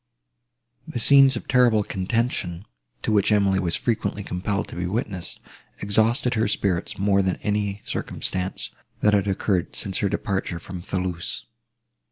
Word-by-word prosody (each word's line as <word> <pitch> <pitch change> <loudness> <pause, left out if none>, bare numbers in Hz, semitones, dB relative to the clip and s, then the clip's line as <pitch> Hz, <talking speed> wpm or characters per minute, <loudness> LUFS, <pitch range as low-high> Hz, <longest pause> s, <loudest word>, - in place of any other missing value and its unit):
The - - -5
scenes 135 +2 +6
of 120 - -6
terrible 120 -5 +4
contention, 95 -3 -1 0.4
to - - 0
which 105 0 +3
Emily 100 -2 +3
was 85 -3 0
frequently 110 -3 -1
compelled 100 +3 -2
to - - -8
be 90 0 -2
witness, 95 -3 -3 0.4
exhausted 115 +5 +2
her 110 -2 +2
spirits 95 -4 -1
more 100 0 +3
than 95 -1 +1
any 105 -1 -1
circumstances, 95 0 -3 0.3
that 105 - +4
had 100 -1 +3
occurred 95 -2 0
since 95 -2 -2
her 100 - +1
departure 95 -3 -2
from 90 +1 -7
Thoulouse. 90 -2 -3
100 Hz, 145 wpm, -24 LUFS, 95-110 Hz, 0.4 s, scenes